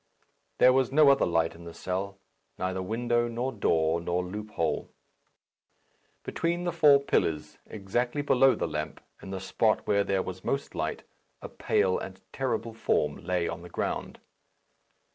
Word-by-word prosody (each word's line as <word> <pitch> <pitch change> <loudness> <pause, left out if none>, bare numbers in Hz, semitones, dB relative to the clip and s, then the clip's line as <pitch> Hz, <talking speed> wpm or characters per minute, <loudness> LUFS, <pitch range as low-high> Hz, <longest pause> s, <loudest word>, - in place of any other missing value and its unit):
There 125 - +6
was 130 -1 +2
no 150 0 +6
other 140 - +3
light 80 -1 +1
in 85 - -13
the 85 -1 -10
cell 95 +1 -3 0.4
neither 95 0 -2
window, 120 +4 0
nor 120 +3 -2
door, 80 -7 +1
nor 90 +1 -1
loophole. 105 -2 -3 1.3
Between 170 +1 -1
the 175 - 0
four 145 -3 +6
pillars, 75 - -1
exactly 120 +7 -2
below 135 -1 +4
the - - -2
lamp, 75 -1 -4 0.2
in - - -9
the 95 -1 -4
spot 110 +3 +1
where 100 -1 +2
there 95 -1 0
was 95 0 -7
most 140 +1 -2
light, - - -3 0.4
a - - -8
pale 95 -1 +1
and 95 0 -8
terrible 120 -4 -2
form 75 -9 0
lay 90 -1 0
on 85 - -5
the 90 - -11
ground. - - -3
100 Hz, 155 wpm, -28 LUFS, 90-125 Hz, 1.3 s, There